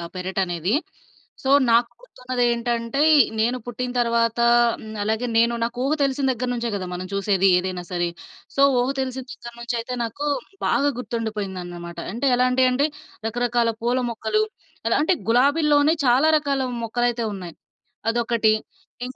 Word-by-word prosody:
పెరటనేది. 185 - -1 0.7
So, 265 - -1 0.2
నాక్కుర్తున్నదేంటంటే 240 - 0 0.4
నేను 240 +3 +1
పుట్టిన 245 +1 -4
తర్వాత 230 -1 +1 0.4
హ్మ్. 215 0 -9
అలాగే 220 +3 -1
నేను 235 +1 +4
నాకు 235 +1 -3
ఊహ 275 +3 +1
తెలిసిన 275 0 0
దగ్గర 250 0 -3
నుంచే 235 -1 -2
గదా! 185 -2 -4
మనం 180 +1 -5
చూసేది 195 -1 +2
ఏదైనా 180 0 -3
సరే. 175 -1 0 0.5
సో, 275 - +2 0.2
ఊహ 245 +2 +1
తెలిసిన 260 0 -4
దగ్గర 235 -1 -10
నుంచయితే 235 +1 -3
నాకు 230 +6 -4 0.4
బాగా 285 - +2
గుర్తుండిపోయిందన్నమాట. 190 -8 -5 0.2
అంటే 245 +5 -1
ఎలాంటియంటే 255 +2 +3 0.4
రకరకాల 240 0 +1
పూల 245 +2 +1
మొక్కలు. 430 - 0 0.5
ఎలాంటే 300 +9 +3 0.2
గులాబీల్లోనే 290 +4 +4
చాలా 255 +5 +4
రకాల 280 -2 -1 0.2
మొక్కలయితే 240 +1 0
ఉన్నాయి. 180 -4 -8 0.6
అదొకటి 230 -2 +2 0.5
ఇన్ 255 +1 -8
235 Hz, 125 wpm, -23 LUFS, 220-255 Hz, 0.7 s, నేను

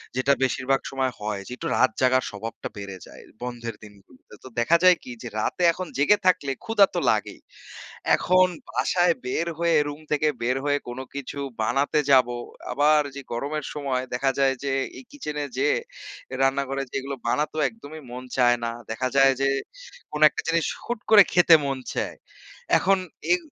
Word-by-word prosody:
যেটা 130 +2 +3
বেশিরভাগ 130 +1 +1
সময় 130 -1 -1
হয় 105 -1 -3
যে - - -10
একটু - - -4
রাত 130 - +4
জাগার 130 0 +3
স্বভাবটা 110 +2 -6
বেড়ে 100 -1 -7
যায় - - -13 0.2
বন্ধের 120 -2 -5
দিনগুলোতে। 105 +4 -17
তো - - -9
দেখা 160 +9 +4
যায় 180 -1 +7
কি? 125 - -9
যে - - -5
রাতে 180 - -1
এখন 185 0 -5
জেগে 175 +9 +4
থাকলে 165 -7 +2
ক্ষুধা 225 -3 +5
তো - - +2
লাগেই। - - -2 0.8
এখন 185 0 +4 0.2
বাসায় 175 -2 +2
বের 160 +7 -1
হয়ে 170 -1 +3
রুম 145 +1 -8
থেকে 150 +1 +2 0.2
বের 125 +2 +1
হয়ে 145 0 +2
কোন 120 +2 -6 0.2
কিছু 140 0 -6 0.2
বানাতে 140 +6 +1
যাব। 130 -2 +6 0.4
আবার 150 +2 +4
যে 140 - -6
গরমের 140 +4 -3
সময় 135 -3 -2
দেখা 135 +2 +1
যায় 135 -1 +3
যে 140 -1 -1 0.3
এই - - -12
কিচেনে 150 - -5
যেয়ে 145 +2 +2 0.6
রান্নাঘরে 135 0 +1
যেয়ে 135 - -2
এগুলো 140 +1 -5 0.2
বানাতে 150 +5 -1
একদমই 155 -9 -11
মন 125 +1 -7
চায় 120 -1 +4
না। 115 - -1 0.2
দেখা 130 +3 -1
যায় 135 0 +6
যে 135 - +3 0.6
কোন 150 - -4
একটা - - -5
জিনিস 165 -1 +1 0.2
হুট 240 -2 -3
করে 205 -2 +10
খেতে 175 -2 +7
মন 135 -1 -1 0.2
চায়। - - -3 0.6
এখন 195 +1 +3 0.3
এই 365 - +6
135 Hz, 175 wpm, -25 LUFS, 130-155 Hz, 0.8 s, করে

